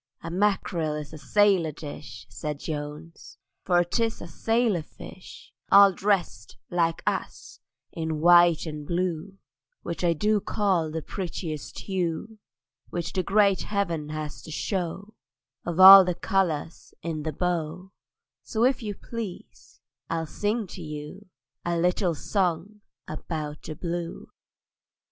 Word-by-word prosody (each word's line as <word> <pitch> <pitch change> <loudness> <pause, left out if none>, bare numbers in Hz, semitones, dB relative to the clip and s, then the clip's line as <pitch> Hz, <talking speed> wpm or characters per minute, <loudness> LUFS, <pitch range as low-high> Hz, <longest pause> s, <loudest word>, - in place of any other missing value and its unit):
"A 165 - -5
mackerel 180 -5 0
is 150 0 -7
a 155 - -8
sailor 195 -2 +3
dish," 145 -8 -9
Said 150 -2 -5
Jones, 150 +2 -7 0.3
"for 175 -1 +3
'tis 225 +6 -1
a - - -8
sailor 225 +2 +1
fish, 180 +4 -13 0.2
All 200 -1 +8
drest, 180 - -1
like 165 -2 0
us, - - -3 0.3
in 160 -2 -3
white 175 0 +6
and 150 -2 -6
blue, 180 +1 -2 0.5
Which 170 +1 -4
I 170 -1 +3
do 210 +6 +2
call 185 -7 0
the 160 0 -4
prettiest 165 -5 -5
hue 190 +3 -3 0.5
Which 175 -1 -4
the 185 - +1
great 200 +1 +3
heaven 170 -7 -2
has 155 -1 -5
to - - -12
show 190 +5 -3 0.5
Of 175 +1 -2
all 190 +1 +12
the 180 -1 -1
colours 175 -3 -2
in 160 -2 -3
the 155 +1 -3
bow: 175 +2 -3 0.5
So, 225 -1 -1
if 260 0 +2
you 210 -3 -4
please, 225 -5 -8 0.3
I'll 165 -1 -1
sing 210 +7 -1
to 180 - -8
you 150 +5 -8 0.4
A 170 0 -1
little 180 0 +1
song 185 +5 -1 0.3
about 155 -1 -5
the 155 - -7
Blue!" 170 +1 -5
175 Hz, 135 wpm, -26 LUFS, 155-195 Hz, 0.5 s, all